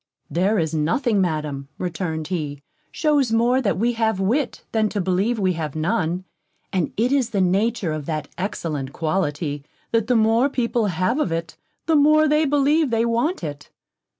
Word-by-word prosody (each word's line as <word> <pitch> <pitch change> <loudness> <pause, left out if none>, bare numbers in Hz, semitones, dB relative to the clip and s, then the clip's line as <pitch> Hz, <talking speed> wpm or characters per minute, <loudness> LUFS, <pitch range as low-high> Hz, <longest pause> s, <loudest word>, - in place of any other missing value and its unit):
"There 195 +6 +2
is 160 -3 0
nothing, 195 - +1
Madam," 150 -5 -2
returned 160 -3 -3
he, 145 -6 -4 0.3
"shews 290 -6 +1
more 240 +3 +3
that 200 -9 0
we 235 +4 +1
have 220 -4 0
wit, 240 +8 0
than 220 -1 +1
to 205 - -3
believe 190 +6 +1
we 190 -3 +1
have 155 -3 -4
none; 170 +2 0 0.5
and 180 -5 0
it 240 +4 +2
is 270 -4 +2
the 210 -4 -1
nature 195 +1 +1
of 155 -2 -4
that 155 -2 -3
excellent 155 -7 -4
quality, 150 -3 -2 0.3
that 230 -1 +1
the 250 - +2
more 225 +4 +3
people 235 -4 0
have 185 - 0
of 245 - 0
it, 165 0 -3 0.3
the 325 - +2
more 305 +1 +5
they 300 +1 +3
believe 290 +1 +2
they 230 0 +1
want 235 - 0
it." 145 -2 -6
195 Hz, 175 wpm, -22 LUFS, 160-240 Hz, 0.5 s, more